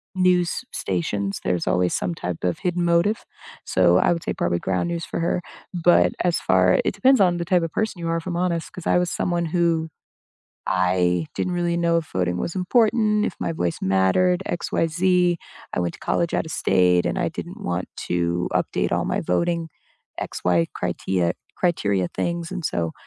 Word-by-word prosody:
news 180 -2 +3
s - - -4
stations, 100 +2 -2
there's 90 -2 -1
always 90 0 +2
some 90 -2 -1
type 90 -1 -5
of 90 - 0
hidden 175 -1 -1
motive, 170 +6 +2 0.4
so 90 -1 +4
I - - +3
would 170 -1 -1
say - - -2
probably 85 0 0
Ground 95 - -1
News 170 -1 -3
for - - -4
her, 170 +1 0 0.3
but 175 0 +4
as 175 -1 +2
far 90 0 +3
it - - 0
depends 265 -4 +4
on 175 -2 +3
the 170 - -3
type 180 0 +3
of 165 -2 -3
person 215 -4 -2
you 170 - -3
are, 165 - +1
if 165 - -6
I'm 180 -2 -3
honest, 170 -2 -1
'cause 180 - -7
I - - +4
was 180 0 0
someone 175 -1 -1
who 165 -1 +1 0.8
I 90 -2 +1
didn't 180 - -1
really 175 -1 0
know 170 0 +2
if 160 - -6
voting 90 -1 0
was 165 - -3
important, 210 +2 +2
if - - -4
my - - -1
voice 90 - -2
mattered, 95 - +2
XYZ. 175 +1 +1 0.4
I - - 0
went 85 -1 -2
to - - -14
college 170 -1 0
out - - 0
of - - -6
state, 90 -2 +3
and - - -1
I - - 0
didn't - - -8
want 90 +1 -3 0.2
to 85 0 0
update - - 0
all - - +1
my - - -1
voting 170 - 0 0.5
X-Y 85 -2 0
criteria- 90 -3 0 0.2
criteria 100 - +1
things 170 - -3
and 185 -3 -5
so 85 - -1
165 Hz, 190 wpm, -23 LUFS, -, 0.8 s, so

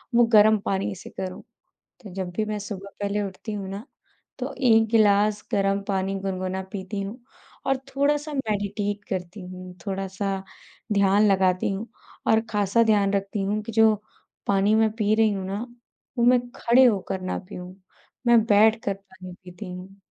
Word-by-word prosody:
वो 240 0 +6
गरम 215 0 +7
पानी 195 0 -1
से 185 - -11
करूँ। 185 -1 -6 0.6
तो 205 -5 -10
जब 185 -2 -3
भी 220 - +1
मैं 215 0 -3
सुबह 200 -1 -7
पहले 205 +1 -1
उठती 200 +3 -6
हूँ 200 -2 -4
ना, 200 +3 -6 0.5
तो - - -4
1 225 -4 +5
गिलास 210 -1 +4
गरम 195 0 +2
पानी 195 0 0
गुनगुना 190 -1 -3
पीती 200 0 -4
हूँ 200 +5 -6 0.5
और 270 - +3 0.2
थोड़ा-सा 295 +2 +1
मेडिटेट 205 -4 -2
करती 185 +1 -4
हूँ, 185 0 -9
थोड़ा-सा 195 0 -3 0.5
ध्यान 200 +1 +4
लगाती 185 0 +2
हूँ। 200 +4 -4 0.4
और 220 - +5
ख़ासा 205 +1 +2
ध्यान 205 -3 +3
रखती 195 0 -1
हूँ 205 +2 0
कि 230 +2 -7
जो 220 0 +5 0.5
पानी 200 +2 +3
मैं 220 0 +4
पी 215 -1 +2
रही 220 0 +4
हूँ 190 -2 -4
ना, 200 +5 -4 0.5
वो 235 - +3
मैं 250 0 +5 0.2
खड़े 245 +3 +5
होकर 195 -5 +1
ना 185 - -3
पियूँ, 180 -2 -8 0.5
मैं 235 -2 +6
बैठ 215 +1 +5
कर 200 - 0
पानी 190 -2 -13
पीती 180 +1 -9
हूँ। 185 +2 -10
200 Hz, 165 wpm, -25 LUFS, 190-220 Hz, 0.6 s, गरम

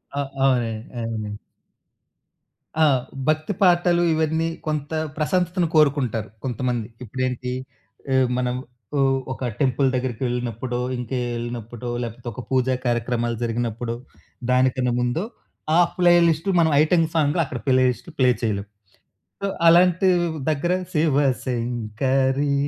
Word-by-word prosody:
ఆ! - - -1 0.2
అవునండి. 115 -4 +1
అదెనండి. 110 -3 -4 1.5
ఆ! - - +7 0.4
భక్తి 155 +5 +1
పాటలు, 175 -1 +4
ఇవన్నీ 160 +1 +1 0.2
కొంత 150 0 -2 0.3
ప్రశంతతను 180 +2 +1
కోరుకుంటారు 135 -7 +2
కొంతమంది. 120 -2 -2 0.2
ఇప్పుడేంటి 125 +1 -3 0.6
ఇ - - +3 0.2
మనం 125 0 0 0.4
ఓ - - +2 0.3
ఒక 130 -1 -3
టెంపుల్ 135 -1 +2
దగ్గరికెళ్ళినప్పుడో 125 -1 -2 0.2
ఇంకే 125 +1 -3 0.2
వెళ్ళినప్పుడో 120 0 -5
లేపోతే 120 +1 -7
ఒక 125 - -6
పూజ 130 -1 +2 0.2
కార్యక్రమాలు 120 -1 0
జరిగినప్పుడో 115 0 -2 0.6
దానికన్నా 125 -1 +2
ముందో 125 +9 0 0.5
ఆ - - +6 0.2
ప్లే 175 -1 +5
లిస్ట్ 165 +4 0
మనం 160 -2 +4
ఐటెమ్ 165 +1 +3
సాంగ్‌ 150 +1 +2
అక్కడ 130 -3 -5
ప్లే 130 -1 +4
లిస్టులు 125 +7 -6
ప్లే 125 -1 +5
చేయలేం. 105 -3 -1 0.7
సో 200 - 0 0.2
అలాంటి 180 +2 +5 0.4
దగ్గర 155 +4 +1 0.2
శివ 150 -3 +2 0.3
శంకరి 130 +4 0
130 Hz, 115 wpm, -23 LUFS, 120-155 Hz, 1.5 s, ఆ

